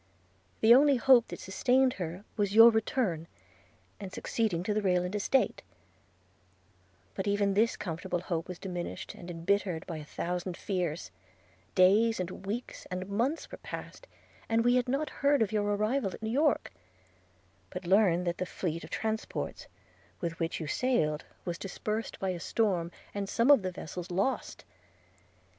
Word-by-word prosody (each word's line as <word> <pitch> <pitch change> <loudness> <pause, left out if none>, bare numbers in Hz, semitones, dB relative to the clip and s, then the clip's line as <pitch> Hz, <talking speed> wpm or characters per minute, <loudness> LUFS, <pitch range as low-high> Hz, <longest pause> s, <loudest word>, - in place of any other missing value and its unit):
– 95 -1 -37
The 225 +2 +8
only 280 +2 +6
hope 245 -1 +5
that - - -7
sustained 255 +6 +2
her 175 +3 -4
was 205 -1 0
your 230 +1 +10
return 215 -7 0 0.7
and 195 -2 -7
succeeding 200 -5 -1
to 210 - 0
the 215 - 0
Rayland 180 -1 +1
estate: 210 +6 +1 1.5
but 190 - -3
even 200 -1 +2
this 220 +4 +2
comfortable 175 0 -3
hope 170 -2 -3
was 180 -1 -6
diminished 180 +1 -5
and 185 -5 -10
embittered 175 0 -1
by 165 - -5
a 155 - -7
thousand 175 +3 -4
fears: 175 - -3 0.3
– 95 +2 -33
days, 220 +4 +4
and 185 +1 -5
weeks, 230 +5 -5
and 185 0 -4
months, 240 +10 -1
were - - -8
passed, - - -8 0.4
and 230 +1 +2
we 245 - +5
had 250 -1 +2
not 280 +4 -1
heard 280 -3 +4
of 210 - -3
your 210 -1 +1
arrival 215 +2 0
at - - -13
New 220 - -2
York; 290 +3 +2 1.0
but - - -7
learned 180 -2 +4
that 175 0 -2
the 185 - -2
fleet 170 -3 -3
of - - -9
transports, 220 0 -3 0.5
with 165 -1 -4
which 165 -1 -2
you 160 - -4
sailed, 155 - 0 0.2
was 175 -1 -3
dispersed 215 +3 -4
by 190 - -1
a 180 -2 -2
storm, 180 -3 0 0.2
and 200 -1 -3
some 240 +5 +4
of 280 - +7
the 185 -1 -3
vessels 180 +1 -7
lost. 200 +8 -2
195 Hz, 165 wpm, -30 LUFS, 175-225 Hz, 1.5 s, your